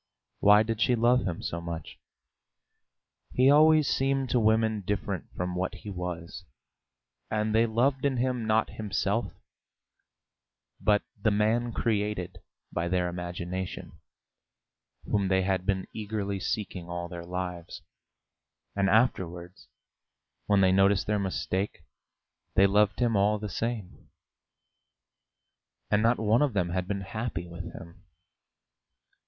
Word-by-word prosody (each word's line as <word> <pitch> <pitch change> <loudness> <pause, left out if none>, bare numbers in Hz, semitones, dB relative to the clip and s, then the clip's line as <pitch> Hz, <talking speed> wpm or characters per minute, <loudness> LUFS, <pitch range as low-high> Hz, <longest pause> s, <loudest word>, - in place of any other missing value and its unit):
Why 105 +1 +6
did 115 0 -3
she 125 +1 +4
love 120 +2 +3
him 85 -2 -4
so 85 - -3
much? 85 -2 -7 1.3
He 130 +2 +5
always 155 0 +6
seemed 135 -1 0
to 125 - +3
women 110 -1 +2
different 100 -1 -3
from 90 0 -2
what 90 +1 -2
he 105 - -8
was, 90 -2 -6 0.9
and 110 0 0
they 115 +1 +4
loved 130 +4 +1
in 140 -2 +1
him 125 -2 -1
not 110 +1 +2
himself, 105 +1 -1 1.5
but 105 -1 +2 0.2
the 110 - +3
man 110 +3 +1
created 105 -5 -2 0.3
by 85 +1 -1
their 90 0 0
imagination, 90 +1 -5 1.1
whom 100 -2 0
they 95 0 +2
had 95 -1 -1
been 95 -2 0
eagerly 100 -2 -3
seeking 95 -4 -4
all 85 0 -4
their 85 0 -7
lives; 90 -1 -5 0.9
and 100 -1 +2
afterwards, 90 -5 0 0.8
when 100 -1 +4
they 95 -1 +5
noticed 95 0 +3
their 105 -1 0
mistake, 95 0 -2 0.7
they 95 - +6
loved 105 +1 +3
him 120 -3 +2
all 105 +2 +3
the 105 0 -5
same. 115 -3 -4 1.8
And 105 - +4
not 115 +2 +3
one 110 +3 +2
of 145 -5 +2
them 90 -4 0
had 90 0 -2
been 100 -1 -2
happy 105 -3 -4
with 85 +1 -8
him. 85 +3 -12
100 Hz, 130 wpm, -28 LUFS, 90-110 Hz, 1.8 s, Why